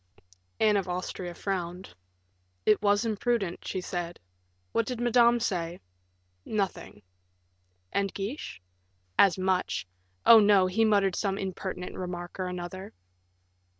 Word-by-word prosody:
Anne 215 -2 +4
of 190 -2 -2
Austria 180 0 -4
frowned. 180 - -4 0.7
"It 210 -1 +4
was 205 +2 +3
imprudent," 220 -4 -1
she 185 - -2
said. 175 -1 -4 0.5
"What 230 - 0
did 250 -2 -3
Madame 240 0 +4
say?" 175 -6 -2 0.6
"Nothing." 195 - -3 0.9
"And 200 -1 0
Guiche?" 195 - -5 0.6
"As 195 -3 +6
much 185 0 0 0.4
oh, 230 - +10
no! 205 -3 +5
he 205 +5 +2
muttered 200 -4 +3
some 195 0 -1
impertinent 190 -1 -5
remark 175 0 -6
or 185 - -1
another." 180 +2 -6
195 Hz, 115 wpm, -28 LUFS, 180-210 Hz, 0.9 s, oh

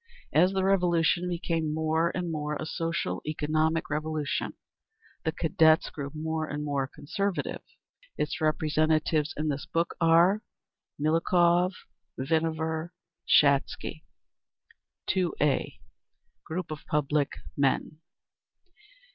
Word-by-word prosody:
As 180 +4 +5
the 190 -1 +1
Revolution 180 -2 +2
became 165 -2 -1
more 160 +1 +1
and 175 -2 -2
more 150 -1 -2
a - - -4
social 165 - -2
economic 155 +2 0
Revolution, 155 -1 -2 0.7
the 160 - +2
Cadets 160 -1 +3
grew 140 -2 -5
more 160 0 -2
and 150 0 -4
more 140 -2 -1
conservative. 195 +6 -3 0.6
Its - - -2
representatives 155 0 +1
in 155 +1 -1
this 140 -1 -3
book 170 +1 0
are: 170 +5 +5 0.6
Miliukov, 175 +3 +3 0.4
Vinaver, 160 +3 -1 0.4
Shatsky. 140 +2 +3 1.1
2a. 170 -6 0 0.7
_Group 160 0 -3
of 150 - -6
Public 150 -1 +1 0.2
Men. 140 +2 0
160 Hz, 100 wpm, -28 LUFS, 150-170 Hz, 1.1 s, As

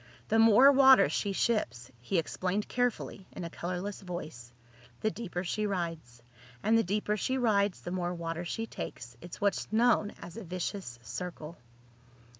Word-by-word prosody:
The 225 - +3
more 230 +5 +8
water 265 -1 +7
she 200 - -1
ships," 130 - -1
he 175 +10 -1
explained 185 +5 -1
carefully, 245 -5 -2
in - - -6
a 170 - -5
colorless 185 +5 -4
voice, 155 -10 -7 0.5
"the 215 - +1
deeper 185 -6 -4
she 210 +4 -1
rides. 165 -11 -4 0.4
And 220 - +3
the 225 - +5
deeper 210 +3 0
she 260 +5 -1
rides, 205 -6 +2
the 175 - -6
more 180 -1 -2
water 165 0 -4
she 225 +6 -3
takes. 120 - -7
It's 175 - -9
what's 200 0 0
known 220 -2 +3
as 170 - -10
a 230 - -6
vicious 180 - -4
circle." 155 +6 -6
185 Hz, 160 wpm, -30 LUFS, 170-215 Hz, 0.5 s, more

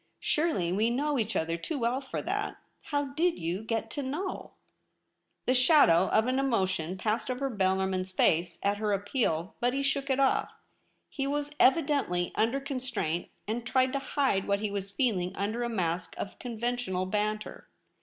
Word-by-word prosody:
Surely 250 - +1
we 215 +4 +2
know 280 +3 0
each 215 -2 -1
other 165 0 0
too 290 - -4
well 245 +1 0
for 265 - -5
that. - - -2 0.3
How 285 -2 -1
did 340 +3 +2
you 170 +4 -2
get 225 0 -2
to 290 - -3
know 305 +9 -4 0.5
?' - - -50
The 255 - +3
shadow 250 - +6
of 220 - +3
an 255 +1 +1
emotion 190 -9 0
passed 215 +6 -1
over 265 +2 -1
Bellarmin's 190 -2 0
face 170 -1 +2
at 200 +1 +2
her 210 -1 0
appeal, 200 - 0
but 245 +2 +1
he 275 - 0
shook 275 0 0
it 265 0 +2
off. 270 -1 +2 0.5
He 275 -2 -3
was 290 +1 -2
evidently 275 - +3
under 230 +5 +1
constraint, 250 - -3 0.2
and 230 +3 -2
tried 255 +1 +2
to 275 - +1
hide 270 -7 0
what 200 0 +1
he 210 -1 -1
was 200 -1 -3
feeling 195 -5 0
under 215 +4 -2
a 240 - -1
mask 180 -5 -2
of 195 - -6
conventional 235 -5 -2
banter. 210 +2 -2
230 Hz, 175 wpm, -29 LUFS, 190-270 Hz, 0.5 s, shadow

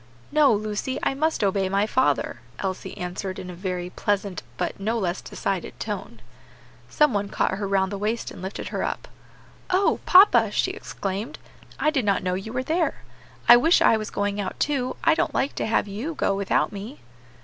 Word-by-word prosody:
"No, 300 -1 +5
Lucy, 215 +4 -1
I - - +2
must 310 -3 0
obey 195 -1 +1
my 200 +2 +2
father," 260 +4 +1 0.2
Elsie 190 -1 -4
answered 185 +1 -4
in 180 - -7
a - - -8
very 180 0 -4
pleasant 200 -2 -1 0.2
but 180 - -3
no 220 +4 -1
less 185 -4 -1
decided - - -4
tone. - - -5 0.7
Some 300 -4 +3
one 205 -1 -1
caught - - 0
her 200 - -2
round 195 0 +1
the 200 - -4
waist 220 +3 -2
and - - -10
lifted 190 +2 -5
her - - -3
up. - - -3 0.6
"Oh! 375 +2 +2
papa," 380 +3 +7
she - - 0
exclaimed, 200 +7 -5 0.4
"I 305 - +3
did 275 -5 0
not 200 -2 +1
know 180 0 0
you 195 +4 -4
were 255 +1 -2
there! 325 +4 -1 0.4
I 240 - +10
wish 325 +8 +4
I - - +5
was 215 -1 -3
going 205 0 -1
too; 265 -3 0
I 330 - +5
don't 315 - -1
like 275 - +1
to - - -2
have 220 -1 +1
you 230 +12 -4
go 200 - +1
without 200 -1 +1
me." 210 +7 -8
205 Hz, 190 wpm, -24 LUFS, 195-260 Hz, 0.7 s, I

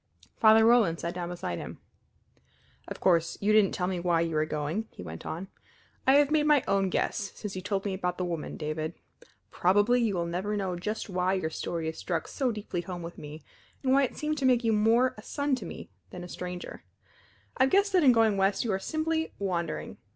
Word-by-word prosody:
Father 220 0 +6
Roland 225 -8 +4
sat 170 +1 -3
down 175 -1 -4
beside 170 - -4
him. - - -7 1.1
"Of - - -7
course 170 -3 +2
you 210 +1 +2
didn't 215 -3 +4
tell 180 - -1
me 180 -1 -2
why 170 -1 +2
you 165 -1 -1
were 155 0 +1
going," 155 +9 -2
he - - -11
went 80 -1 -8
on. 175 +4 -5 0.6
"I 265 - +7
have 290 0 +5
made 300 -1 +3
my 295 -4 +5
own 195 -1 +2
guess 200 +2 -1
since 205 -2 -6
you 185 - -4
told 200 0 -2
me 200 - -1
about 180 -2 -2
the 180 - -1
woman, 170 -3 -4
David. 155 +1 -3 0.6
Probably 205 +7 +3
you 220 -4 +1
will 170 -1 -1
never 185 +5 -2
know 190 -3 -2
just 210 +7 -4
why 185 -1 0
your 160 -4 -2
story 165 0 -3
has 160 0 -4
struck 170 -3 -2
so 260 -3 -1
deeply 205 -5 -4
home 175 0 -7
with 170 +1 -8
me 150 +1 -9 0.4
and 260 -1 +3
why 275 - +5
it 265 - -1
seemed 305 0 -2
to 270 - 0
make 250 -1 +3
you 225 -1 +2
more 230 +4 +3
a - - -9
son 285 +5 -2
to - - -7
me - - -9 0.2
than 180 - -8
a - - -7
stranger. 180 0 -7 0.7
I 260 - +5
have 265 - -1
guessed 400 0 +3
that 365 -3 +4
in 265 - +7
going 225 -3 +3
west 195 +3 +2
you 230 - -1
are 190 - 0
simply 320 +7 -2
wandering. 180 -4 -3
195 Hz, 225 wpm, -28 LUFS, 175-235 Hz, 1.1 s, I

